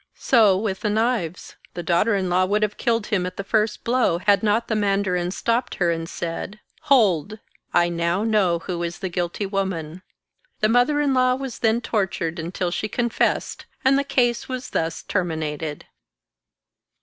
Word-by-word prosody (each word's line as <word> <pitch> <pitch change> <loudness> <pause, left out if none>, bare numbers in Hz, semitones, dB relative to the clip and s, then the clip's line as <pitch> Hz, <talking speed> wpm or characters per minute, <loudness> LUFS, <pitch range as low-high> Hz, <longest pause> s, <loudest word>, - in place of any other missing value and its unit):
* - - -49 0.2
So 215 -7 +6
with 195 -2 -2
the 210 - -1
knives: 215 -6 -1 0.2
the 175 - -4
daughter 185 +6 +2
in 190 -2 0
law 180 +1 +2
would 210 +3 +1
have 210 -1 -1
killed 230 -3 0
him 190 -5 0
at 185 - -8
the 200 - -3
first 215 +1 0
blow, 240 -8 +2
had 200 +2 +3
not 220 +2 +1
the 220 - -1
mandarin 195 -4 0
stopped 235 +6 -1
her, 175 -2 +1
and 165 0 -3
said, 175 +6 -5
" - - -35
Hold! 215 - +3 0.3
I 175 - +3
now 170 +3 0
know 210 -6 +2
who 175 0 -5
is 170 0 -3
the 190 - -4
guilty 175 +3 -2
woman." 185 -4 -3 0.6
The 215 - +2
mother 245 +6 +3
in 285 -2 +2
law 255 -1 +3
was 265 -2 -6
then 225 +1 +2
tortured 190 -7 -2
until 175 +2 -3
she 215 - -2
confessed, 235 +1 -1 0.2
and 265 +1 +5
the 280 - +2
case 240 -3 0
was 255 -1 -5
thus 160 0 -2
terminated. 160 -4 -3
200 Hz, 180 wpm, -23 LUFS, 175-230 Hz, 0.6 s, So